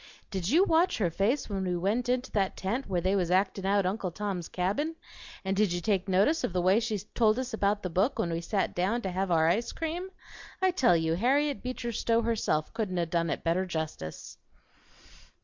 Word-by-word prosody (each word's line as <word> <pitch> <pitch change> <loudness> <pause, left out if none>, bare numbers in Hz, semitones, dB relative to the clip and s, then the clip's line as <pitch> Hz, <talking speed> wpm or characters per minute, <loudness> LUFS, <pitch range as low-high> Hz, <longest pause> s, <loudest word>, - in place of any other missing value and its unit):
Did 190 -3 -2
you 330 +9 +5
watch 340 -1 +3
her 180 -6 +1
face 215 - 0
when 195 -2 -3
we 180 -1 -1
went 215 +8 0
into 250 +1 0
that 195 -3 0
tent 230 +8 -2
where 180 -2 0
they 190 +3 +1
was 180 -3 0
actin' 190 +1 +1
out 200 -1 +2
Uncle 190 0 -1
Tom's 190 -2 -4
Cabin? 210 - -1 0.5
And 190 0 0
did 205 -2 +2
you 175 - -1
take 195 0 0
notice 200 - +3
of - - -1
the 180 - +1
way 190 +4 +5
she 225 -2 -1 0.2
told 220 -1 +3
us 255 -2 -3
about 205 -1 0
the 185 - -2
book 195 - +1
when 170 - -1
we 165 - -2
sat 195 +3 -1
down 200 +7 0
to 190 - -2
have 190 +1 -1
our 160 -2 +3
ice 215 +8 +1
cream? 335 +3 -4 0.5
I 375 0 +3
tell 250 - +4
you 160 0 0
Harriet 275 - +1
Beecher 250 -1 -4
Stowe 230 +1 +1
herself 215 -9 0
couldn't 200 -5 -2
'a' 170 - +1
done 170 0 0
it - - -3
better 175 +3 +1
justice." 160 - -5
195 Hz, 215 wpm, -29 LUFS, 180-235 Hz, 0.5 s, you